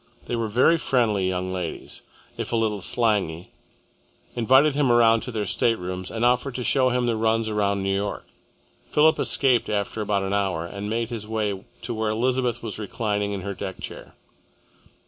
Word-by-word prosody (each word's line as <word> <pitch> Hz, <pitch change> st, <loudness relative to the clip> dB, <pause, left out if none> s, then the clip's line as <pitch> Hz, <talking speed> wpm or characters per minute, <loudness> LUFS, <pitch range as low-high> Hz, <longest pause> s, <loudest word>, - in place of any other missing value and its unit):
They 120 Hz, -, -2 dB
were 115 Hz, -1 st, -1 dB
very 130 Hz, +10 st, +3 dB
friendly 110 Hz, -9 st, +1 dB
young 95 Hz, 0 st, -2 dB
ladies, 90 Hz, -3 st, -5 dB, 0.3 s
if -, -, -5 dB
a -, -, +1 dB
little 110 Hz, -3 st, 0 dB
slangy, 95 Hz, -6 st, 0 dB, 0.8 s
invited 130 Hz, +5 st, +4 dB
him 140 Hz, -3 st, +2 dB
around 115 Hz, -1 st, +5 dB
to 125 Hz, -, -5 dB
their 110 Hz, -3 st, -2 dB
staterooms, 90 Hz, -2 st, -1 dB
and 115 Hz, +1 st, -1 dB
offered 125 Hz, +2 st, +1 dB
to 125 Hz, -, -2 dB
show 130 Hz, +1 st, +3 dB
him 125 Hz, 0 st, 0 dB
the 120 Hz, -1 st, +1 dB
runs 110 Hz, 0 st, +1 dB
around 100 Hz, -2 st, 0 dB
New 95 Hz, 0 st, 0 dB
York. 100 Hz, +1 st, -3 dB, 0.6 s
Philip 155 Hz, +1 st, +3 dB
escaped 130 Hz, -4 st, +2 dB
after 105 Hz, +1 st, -2 dB
about 100 Hz, -2 st, 0 dB
an 95 Hz, +1 st, -2 dB
hour 95 Hz, -5 st, 0 dB
and 100 Hz, +4 st, -6 dB
made 115 Hz, +2 st, -2 dB
his 110 Hz, -3 st, -5 dB
way 105 Hz, -3 st, -2 dB, 0.2 s
to -, -, -3 dB
where 110 Hz, -1 st, -1 dB
Elizabeth 120 Hz, +1 st, 0 dB
was 110 Hz, -2 st, -5 dB
reclining 105 Hz, -1 st, -2 dB
in 100 Hz, -1 st, -4 dB
her 100 Hz, +2 st, -4 dB
deck 95 Hz, 0 st, -6 dB
chair. -, -, -9 dB
110 Hz, 180 wpm, -24 LUFS, 100-120 Hz, 0.8 s, around